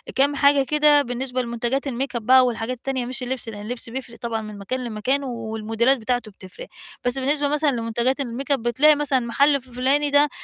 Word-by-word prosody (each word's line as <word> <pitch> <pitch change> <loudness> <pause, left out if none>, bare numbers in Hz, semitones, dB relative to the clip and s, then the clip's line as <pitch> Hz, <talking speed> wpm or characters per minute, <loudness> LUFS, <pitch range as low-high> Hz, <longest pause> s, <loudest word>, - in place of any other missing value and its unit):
كام 280 +2 +2
حاجة 280 0 +4
كده 300 +1 +4
بالنسبة 255 0 -3
لمُنتجَات 240 +3 -2
الmakeup 255 0 -3
بقى، 255 +3 +6
والحاجات 240 +1 -2
التانية 260 0 -3
مش 255 +1 -4
اللبس، 250 -2 -4
لإن 205 -2 -8
اللبس 230 +2 -4
بيفرق 250 -1 -7
طبعًا 230 -2 -3
من 215 -1 -8
مكان، 255 +6 -4
لمكان 245 +5 -1
و 230 -4 -5
الموديلات 225 +5 +1
بتاعته 245 -2 -2
بتفرِق، 185 -1 -12 0.4
بس 245 +2 +3
بالنسبة 285 +2 0
مثلًا 295 +1 +2
لمنتجَات 240 +3 -1
الmakeup 270 +3 -2
بتلاقي 270 +5 +3
مثلًا 285 -2 +1
المحل 275 +4 +2
ف 255 - -18
فُلاني 270 +4 +1
ده، 290 +1 +4
255 Hz, 190 wpm, -22 LUFS, 235-275 Hz, 0.4 s, بقى